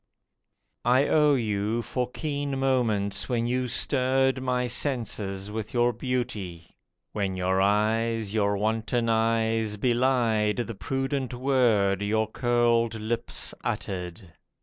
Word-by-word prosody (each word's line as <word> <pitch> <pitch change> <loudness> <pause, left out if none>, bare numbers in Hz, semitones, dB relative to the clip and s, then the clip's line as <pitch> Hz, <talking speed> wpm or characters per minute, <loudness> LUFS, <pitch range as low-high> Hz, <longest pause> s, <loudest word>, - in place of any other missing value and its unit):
I 130 +4 +3
owe 150 -2 +4
you 110 -1 -1
for 125 +1 -2
keen 145 -1 -3
moments 120 -7 0
when 120 -2 0
you 125 +1 0
stirred 130 +1 +1
My 125 -1 0
senses 110 -6 -3
with 110 +2 -5
your 120 0 +3
beauty, 110 -9 -4 0.4
when 100 -3 -2
your 95 +1 +1
eyes 110 +1 +1
(Your 100 -2 +1
wanton 115 +3 0
eyes) 110 -1 +1
belied 120 -3 +2
the 120 -1 -3
prudent 135 +3 -2
word 120 -7 +2
Your 110 +1 +1
curled 120 0 +1
lips 110 +2 -3
uttered. 90 -1 -5
115 Hz, 115 wpm, -26 LUFS, 105-125 Hz, 0.4 s, owe